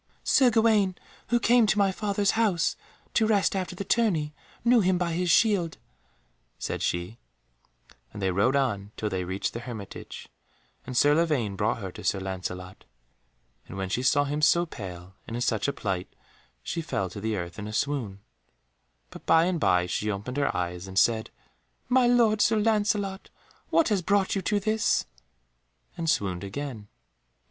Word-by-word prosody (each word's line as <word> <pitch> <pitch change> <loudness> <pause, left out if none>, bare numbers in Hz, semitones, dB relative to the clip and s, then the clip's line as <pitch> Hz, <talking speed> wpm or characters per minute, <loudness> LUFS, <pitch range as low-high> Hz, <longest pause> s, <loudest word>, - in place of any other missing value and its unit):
"Sir 260 -2 +5
Gawaine, 220 -5 +3 0.3
who 240 +1 +2
came 235 -1 +4
to 210 - +2
my 200 -1 +3
father's 200 0 0
house 215 -7 +1 0.4
to 220 - +3
rest 205 -3 +2
after 185 -1 -3
the 200 - -4
tourney, 185 -9 +1 0.3
knew 240 0 +6
him 185 -1 +2
by 175 -1 -1
his 180 +1 -1
shield," 180 -3 +3 0.8
said - - -4
she, 90 +7 -2 0.9
and - - -9
they 95 -1 0
rode 105 +9 +2
on 105 -7 0
till 105 - -2
they 95 -1 -1
reached 95 +2 -3
the 120 - -4
hermitage, 115 -5 -8 0.6
and 125 -1 -4
Sir 145 +4 +5
Lavaine 150 -11 +1
brought 105 +2 0
her 95 -2 -5
to - - -10
Sir 100 - +1
Lancelot. 95 -1 -6 0.8
And 95 - -8
when 95 -1 -3
she 120 - -1
saw 140 +3 +3
him 145 +1 -2
so 170 +3 +4
pale, 95 - -9
and 115 - -5
in - - -4
such 110 -1 0
a - - +1
plight, 95 -3 -3 0.5
she 170 - -3
fell 95 -11 -2
to 100 - -7
the 110 0 -1
earth 85 +1 -6
in 105 - -5
a - - -6
swoon, 110 -5 -2 0.9
but - - -12
by 165 0 +5
and 180 -2 0
by 90 -9 +3
she 105 +4 -2
opened 105 +6 -4
her 140 - 0
eyes 90 +1 -3
and 95 0 -8
said, 110 +1 +3 0.6
"My 255 -1 +4
lord 230 -3 +4
Sir 220 +1 +3
Lancelot, 205 -2 0 0.4
what 330 - +3
has 205 -4 +1
brought 195 +2 +1
you 195 - -1
to 205 +3 0
this?" 215 +2 +1 0.9
and 165 -2 -2
swooned 95 -9 0
again. 110 0 -6
145 Hz, 175 wpm, -27 LUFS, -, 0.9 s, knew